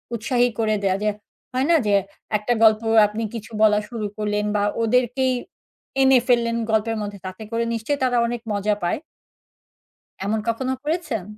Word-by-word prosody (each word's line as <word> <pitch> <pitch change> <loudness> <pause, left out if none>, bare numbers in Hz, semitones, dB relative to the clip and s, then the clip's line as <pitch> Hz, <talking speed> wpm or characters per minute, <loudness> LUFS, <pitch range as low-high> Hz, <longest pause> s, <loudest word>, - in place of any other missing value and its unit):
উৎসাহী 245 +2 +1
করে 215 -1 +2
দেওয়া 190 -1 +2
যে, 210 - +2 0.4
হয়না 275 +7 +3
যে 200 - +4 0.4
একটা 215 +4 0
গল্প 220 0 +6 0.3
আপনি 215 +2 -4
কিছু 230 0 -7
বলা 210 -1 +5
শুরু 225 -3 -4
করলেন 210 0 -1
বা 205 - +2 0.2
ওদেরকেই 250 +2 +2 0.7
এনে 265 -1 +6
ফেললেন 235 -1 +2 0.2
গল্পের 220 +1 +1
মধ্যে 205 -1 -6
তাতে 185 +4 -8
করে 230 0 0
নিশ্চয়ই 230 +6 -2
তারা 245 -1 +2
অনেক 240 -1 -4
মজা 205 +1 +1
পায়। 175 - 0 1.2
এমন 215 +2 0
কখনো 260 +3 -1
করেছেন? 305 - -2
225 Hz, 155 wpm, -22 LUFS, 210-250 Hz, 1.2 s, গল্প